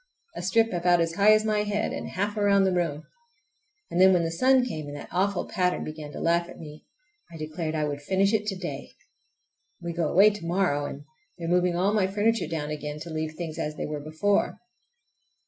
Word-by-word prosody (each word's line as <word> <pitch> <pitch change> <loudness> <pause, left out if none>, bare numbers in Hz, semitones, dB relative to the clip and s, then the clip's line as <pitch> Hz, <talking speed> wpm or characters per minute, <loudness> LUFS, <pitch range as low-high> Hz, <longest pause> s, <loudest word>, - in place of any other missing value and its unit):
A - - -5
strip 225 +5 +2
about 175 0 +3
as 165 0 0
high 200 +4 +5
as 215 0 +4
my 215 -1 +1
head 210 +1 -1
and - - -5
half 205 +3 -2
around 200 -2 +3
the 190 - +2
room. 160 -4 -1 0.9
And 175 - +1
then 190 0 +7
when 175 -2 +3
the 165 - -1
sun 255 +8 +3
came 155 -11 -5
and 145 - -7
that 145 - -9
awful 195 +1 0
pattern 180 0 0
began 155 -1 -7
to - - -6
laugh 170 +1 +1
at - - -11
me 150 -1 -11 0.4
I 165 - -9
declared 155 +1 -4
I 155 - 0
would 145 -1 -4
finish 195 +6 +1
it 215 -1 0
to 195 - -1
day! 170 -7 -6 0.9
We 170 -1 -5
go 165 -2 0
away 200 +4 +6
to 205 -4 -8
morrow, 170 -4 0
and 140 - -8 0.3
they 170 - -6
are - - -3
moving 180 0 +2
all 190 +4 +1
my 205 -3 +2
furniture 210 +4 +1
down 150 -2 -3
again 150 0 -5
to 165 +1 -7
leave 155 0 -3
things 165 -1 -6
as 150 -1 -3
they - - -4
were 150 0 -4
before. 160 +7 0
175 Hz, 220 wpm, -26 LUFS, 155-200 Hz, 0.9 s, then